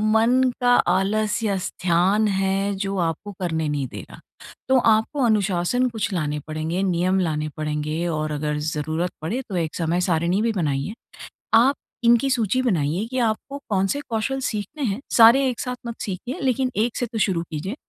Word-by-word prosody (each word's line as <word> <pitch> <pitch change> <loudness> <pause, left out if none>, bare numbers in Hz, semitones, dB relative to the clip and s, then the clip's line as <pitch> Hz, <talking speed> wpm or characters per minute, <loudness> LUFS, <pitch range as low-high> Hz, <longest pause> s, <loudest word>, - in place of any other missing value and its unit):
मन 235 +4 +4 0.2
का 245 0 +4 0.2
आलस्य 210 +2 0
स्थान 185 +4 +1
है, 195 0 0
जो 195 0 -3
आपको 185 +6 -5
करने 160 -4 -1
नहीं 145 -3 -1
दे - - -8
रहा। - - -12 0.5
तो 265 - +5
आपको 225 +5 +2
अनुशासन 210 +2 +1
कुछ 220 -3 -3
लाने 150 -4 -1
पड़ेंगे। 155 +4 -2
नियम 185 0 +1
लाने 155 -4 -1
पड़ेंगे 155 +2 -2
और 155 0 -2
अगर 150 0 -2 0.2
ज़रूरत 160 +4 -2
पड़े, 205 +12 -2
तो 190 - -4
एक 165 -3 -2
समय 170 +1 0
सारिणी 170 +4 +1
भी 230 +1 +1
बनाइए। 150 -1 -1 0.6
आप 245 +5 +5 0.3
इनकी 235 +3 +4
सूची 255 -1 +1
बनाइए, 180 - 0
कि 255 +2 -5
आपको 275 +6 -5
कौन-से 195 +7 0
कौशल 235 +4 -1
सीखने 215 +8 -5
हैं, 210 -1 -1 0.2
सारे 240 +4 +7
एक 245 - -5
साथ 250 0 -3
मत 230 - -6
सीखिए, 205 +7 -5
लेकिन 260 -1 0
एक 225 +2 0
से 245 - 0
तो 235 -1 -6
शुरू 190 -5 +1
कीजिए। 165 - -4
195 Hz, 170 wpm, -23 LUFS, 165-230 Hz, 0.6 s, सारे